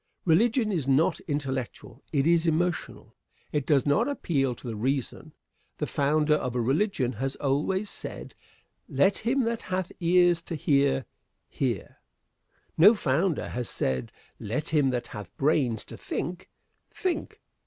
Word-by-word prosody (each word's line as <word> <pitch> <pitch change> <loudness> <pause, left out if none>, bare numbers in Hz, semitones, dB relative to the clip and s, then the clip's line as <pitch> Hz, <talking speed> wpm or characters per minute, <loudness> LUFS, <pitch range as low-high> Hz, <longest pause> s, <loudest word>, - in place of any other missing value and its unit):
Religion 220 +6 +3
is 160 -9 -1
not 140 +4 +3
intellectual 135 -4 -4
it 140 -3 +1
is 170 0 +3
emotional. 170 +1 -1 0.4
It 145 -3 -1
does 140 -3 +3
not 205 - +3
appeal 140 - 0
to 125 - -11
the 115 - -4
reason. 130 +3 -2 0.5
The - - -1
founder 150 +2 +2
of 125 -5 -1
a - - +1
religion 135 - +1
has 135 +5 -3
always 150 +9 0
said: - - -7 0.6
"Let 195 +1 +2
him 255 +5 +1
that 230 0 -1
hath 185 -1 -3
ears 175 -1 +4
to 165 - -5
hear, 140 -2 +2 0.4
hear!" - - -3 0.8
No 205 +8 +8
founder 165 0 0
has 120 -1 -3
said: 65 -1 -2 0.3
"Let 135 +10 -3
him 145 -4 +3
that 120 -2 -2
hath 105 -7 -9
brains 135 -6 +1
to - - -9
think, 180 +1 -5 0.4
think!" 370 -3 -3
150 Hz, 145 wpm, -27 LUFS, 130-180 Hz, 0.8 s, No